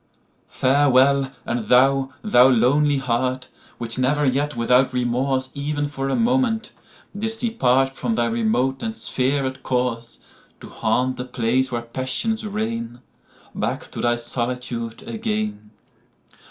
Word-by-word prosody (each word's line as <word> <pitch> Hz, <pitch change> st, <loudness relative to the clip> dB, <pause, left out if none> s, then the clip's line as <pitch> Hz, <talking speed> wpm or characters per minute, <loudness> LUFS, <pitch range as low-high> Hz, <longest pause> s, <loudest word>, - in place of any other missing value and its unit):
Farewell! 135 Hz, 0 st, +3 dB
and 120 Hz, -3 st, -3 dB
thou, 135 Hz, +2 st, +4 dB
thou 130 Hz, -, +6 dB
lonely 140 Hz, +4 st, +3 dB
heart, 130 Hz, 0 st, -1 dB, 0.3 s
Which 120 Hz, +1 st, -3 dB
never 145 Hz, +3 st, +2 dB
yet 140 Hz, +1 st, 0 dB
without 125 Hz, +3 st, +3 dB
remorseEven 135 Hz, +4 st, -1 dB
for 135 Hz, -1 st, -3 dB
a -, -, +1 dB
moment 235 Hz, -2 st, +1 dB, 0.4 s
did'st 225 Hz, +2 st, -3 dB
departFrom 135 Hz, -, +1 dB
thy 120 Hz, -, +1 dB
remote 120 Hz, +3 st, 0 dB
and 225 Hz, -1 st, -3 dB
spherèd 130 Hz, -, -1 dB
courseTo 125 Hz, -3 st, -5 dB
haunt 125 Hz, +3 st, 0 dB
the 125 Hz, -, -4 dB
place 125 Hz, +1 st, 0 dB
where 120 Hz, -1 st, -2 dB
passions 130 Hz, -, -1 dB
reign, 220 Hz, -, -4 dB, 0.5 s
Back -, -, -3 dB
to -, -, -5 dB
thy 120 Hz, 0 st, +2 dB
solitude 120 Hz, -1 st, -4 dB
again! 105 Hz, -2 st, -3 dB
130 Hz, 115 wpm, -22 LUFS, 120-145 Hz, 0.5 s, thou